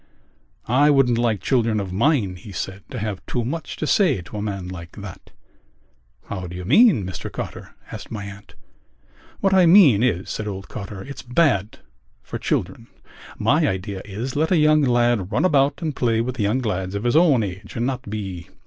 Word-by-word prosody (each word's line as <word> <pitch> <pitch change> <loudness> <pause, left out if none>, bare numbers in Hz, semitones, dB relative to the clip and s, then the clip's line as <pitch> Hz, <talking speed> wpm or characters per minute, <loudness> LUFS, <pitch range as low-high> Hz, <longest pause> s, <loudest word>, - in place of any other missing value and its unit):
"I 140 +5 +4
wouldn't 130 -5 +3
like 115 -5 +1
children 115 -4 +1
of 95 -2 -5
mine," 115 -3 +1
he 95 +3 -11
said, 95 +1 -5
"to 130 - -6
have 105 -3 -4
too 120 -2 -2
much 160 +6 -4
to - - -3
say 185 - +3
to 95 +5 -9
a - - -3
man 100 -3 -4
like 85 -2 -9
that." 100 -2 -10 1.0
"How 95 -3 -5
do 90 - -8
you 90 0 -6
mean, 200 - +5
Mr 90 -2 -6
Cotter?" - - -7 0.2
asked - - -8
my 105 -2 -6
aunt. 100 0 -11 0.9
"What 195 -1 +2
I 185 -2 +6
mean 165 - +7
is," 100 -7 0
said 110 - -4
old 95 -2 -6
Cotter, 100 -2 -7
"it's 140 -1 -8
bad 125 - +1 0.4
for - - -6
children. 95 +6 -2 0.5
My - - +2
idea 95 +1 -3
is: 110 +6 -5
let 160 +3 +1
a 180 - +4
young 155 0 +4
lad 120 -6 +2
run - - +1
about 140 -2 +2
and 155 -4 -2
play 115 -2 +1
with 120 +2 -3
young 105 +5 +1
lads 95 -4 -3
of 100 - -3
his 120 +3 +1
own 155 -8 +5
age 100 +1 -7
and 120 - -1
not 130 -4 -3
be.... 95 -5 -6
110 Hz, 195 wpm, -22 LUFS, 95-135 Hz, 1.0 s, mean